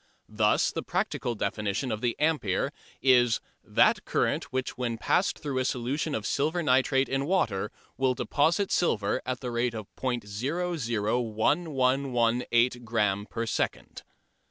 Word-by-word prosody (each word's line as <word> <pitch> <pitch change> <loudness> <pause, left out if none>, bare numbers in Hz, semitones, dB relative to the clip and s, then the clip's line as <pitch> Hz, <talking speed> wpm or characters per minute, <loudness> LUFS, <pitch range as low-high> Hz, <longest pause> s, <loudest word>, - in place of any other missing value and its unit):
Thus - - +3
the - - -3
practical 120 - -2
definition 105 +4 -2
of 110 - -3
the 120 -2 0
ampere 150 -12 +1 0.3
is 120 -3 +5 0.2
"that - - +3
current - - 0
which 130 0 -3
when 120 -2 -2
passed 185 - +1
through 140 -4 -3
a - - +1
solution 130 +5 -1
of 110 - -3
silver 160 +8 0
nitrate 130 -1 +3
in 135 +1 -1
water 110 - 0 0.3
will 130 -1 +2
deposit 165 +10 +1
silver 110 - +1
at 130 -1 -2
the 125 -2 -4
rate 120 0 0
of 110 -2 -5
·001118 125 - 0
gramme 105 -3 0
per 115 0 -3
second." - - -3
125 Hz, 130 wpm, -28 LUFS, 115-140 Hz, 0.3 s, is